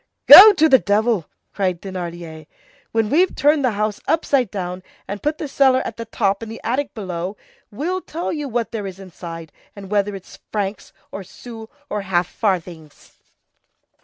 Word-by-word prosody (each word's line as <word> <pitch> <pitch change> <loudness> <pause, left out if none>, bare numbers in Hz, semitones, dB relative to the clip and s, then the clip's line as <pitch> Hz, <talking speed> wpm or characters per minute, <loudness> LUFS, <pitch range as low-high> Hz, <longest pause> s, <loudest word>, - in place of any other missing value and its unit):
"Go 425 +2 +12
to 315 -4 +3
the 265 -4 +6
devil!" 210 -4 0 0.3
cried 185 -4 -1
Thénardier. 170 -4 -8 0.4
"When 225 -1 0
we've 350 +5 +2
turned 295 +1 +2
the 250 -4 +1
house 210 -1 -2
upside 280 -6 +1
down 180 -2 -5 0.3
and 200 +1 -6
put 300 +1 -1
the 310 - -5
cellar 265 -2 +2
at 225 - -6
the 230 - -6
top 200 -3 -1
and 225 -1 -7
the 225 - -8
attic 260 +4 -2
below, 185 -1 -5 0.3
we'll 350 - -3
tell 335 0 -5
you 295 -3 -4
what 235 -2 -2
there 215 -4 -4
is 190 0 -9
inside, 165 -4 -9 0.2
and 195 -1 -11
whether 205 -1 0
it's 190 - -12
francs 205 -1 -4 0.2
or 195 - -7
sous 225 +3 -11 0.2
or 210 -5 -3
half 185 -2 0
farthings." 175 -6 -4
210 Hz, 170 wpm, -20 LUFS, 185-255 Hz, 0.4 s, Go